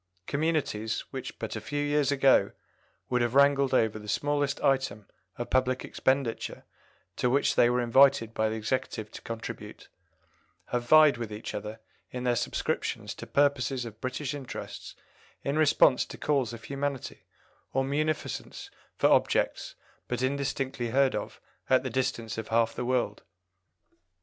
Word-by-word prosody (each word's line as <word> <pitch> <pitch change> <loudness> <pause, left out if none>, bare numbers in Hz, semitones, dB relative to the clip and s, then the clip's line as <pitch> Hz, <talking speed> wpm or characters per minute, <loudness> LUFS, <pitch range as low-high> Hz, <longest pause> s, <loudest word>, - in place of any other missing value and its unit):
Communities, 140 - -1
which 130 -2 -6
but 110 - -5
a 110 - -4
few 145 +7 -2
years 145 -1 +2
ago 135 -1 +4 0.6
would 125 -1 +2
have 120 +1 0
wrangled 140 -1 +5
over 110 -4 +2
the 105 - -11
smallest 145 +4 0
item 135 -6 +1 0.3
of 120 - -5
public 130 0 +1
expenditure 130 -3 -1 0.5
to 125 - +1
which 140 +3 +2
they 120 - +5
were 125 0 +1
invited 120 -2 +4
by 110 0 +1
the 110 - -3
Executive 110 -1 -3
to - - -9
contribute, 115 0 -7 0.8
have 120 -1 -1
vied 155 -4 +7
with 115 -3 -5
each 105 +1 -6
other 105 +2 -6 0.3
in 125 0 -5
their 125 -1 +2
subscriptions - - -2
to - - -9
purposes 135 -3 +1
of 110 -1 -10
British 130 +2 -3
interests 140 -3 -7 0.5
in 140 - -1
response 145 -4 +4
to - - -10
calls 140 -6 0
of 115 -1 -9
humanity, 140 +1 -4 0.4
or 135 - +1
munificence 150 +3 -3 0.2
for - - -1
objects - - +1 0.3
but 125 +1 -2
indistinctly 135 -2 -1
heard 135 +2 +3
of - - -5 0.3
at 130 0 +4
the 130 - -3
distance 115 -3 -2
of 110 - -6
half 115 0 +2
the - - -4
world." 120 -5 0
130 Hz, 150 wpm, -28 LUFS, 115-140 Hz, 0.8 s, vied